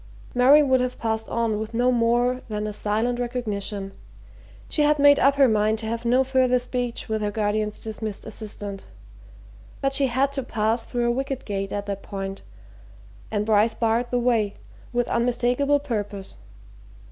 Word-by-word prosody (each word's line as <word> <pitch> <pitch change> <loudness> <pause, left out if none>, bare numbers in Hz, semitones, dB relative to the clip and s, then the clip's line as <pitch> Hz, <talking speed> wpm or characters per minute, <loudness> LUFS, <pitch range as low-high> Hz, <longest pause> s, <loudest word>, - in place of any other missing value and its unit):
Mary 270 +5 +6
would 260 -2 +3
have 250 0 -2
passed 220 -1 -2
on 230 -2 0
with 220 +1 -5
no 245 +2 +3
more 240 +1 +2
than 210 0 -3
a 210 - -4
silent 220 +4 -1
recognition 210 -5 -3 0.8
she - - -1
had 300 0 +4
made 285 0 +6
up 275 +1 +4
her 275 -1 +5
mind 215 -1 +2
to 220 - -5
have 230 +1 -3
no 250 +3 +4
further 260 -1 +2
speech 245 -1 -3
with 220 -1 -1
her 210 - 0
guardian's 210 0 -1
dismissed 215 -2 -5
assistant. 205 -2 -5 0.9
But 275 0 0
she 275 0 +3
had 265 +3 +1
to 280 -1 -2
pass 225 -1 0
through 240 -1 -1
a - - +3
wicket 270 +1 -3
gate 195 -1 -3
at 205 0 -3
that 200 -1 -4
point, 195 -1 -6 0.9
and 210 -1 -1
Bryce 220 +1 +3
barred 230 +1 0
the 245 - 0
way, 230 -4 +1 0.4
with 245 -1 0
unmistakable 245 +4 +1
purpose. 205 -8 -5
235 Hz, 170 wpm, -24 LUFS, 210-250 Hz, 0.9 s, Mary